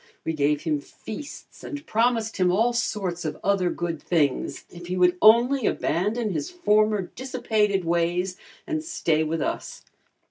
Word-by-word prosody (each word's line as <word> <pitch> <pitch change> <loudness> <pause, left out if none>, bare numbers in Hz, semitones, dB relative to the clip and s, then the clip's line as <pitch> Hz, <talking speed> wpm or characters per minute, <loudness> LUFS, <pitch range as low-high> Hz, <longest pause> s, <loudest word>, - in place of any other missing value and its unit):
We 160 - -1
gave 145 -1 +1
him 155 -3 0
feasts 220 - -10
and 290 +1 -7
promised 225 -1 +1
him 180 -2 +3
all 225 +6 +2
sorts 195 -7 -2
of 155 -2 -3
other 195 -2 +2
good 170 -3 -3
things, 150 -6 0
if 175 0 -10
he 180 +1 -2
would 180 0 +4
only 235 +4 +5
abandon 210 +5 0
his 155 -5 -3
former 215 - +2
dissipated 215 -7 0
ways 175 +2 0 0.3
and 315 -2 -2
stay 165 - 0
with 160 0 -1
us. - - -4
190 Hz, 150 wpm, -25 LUFS, 170-230 Hz, 0.3 s, only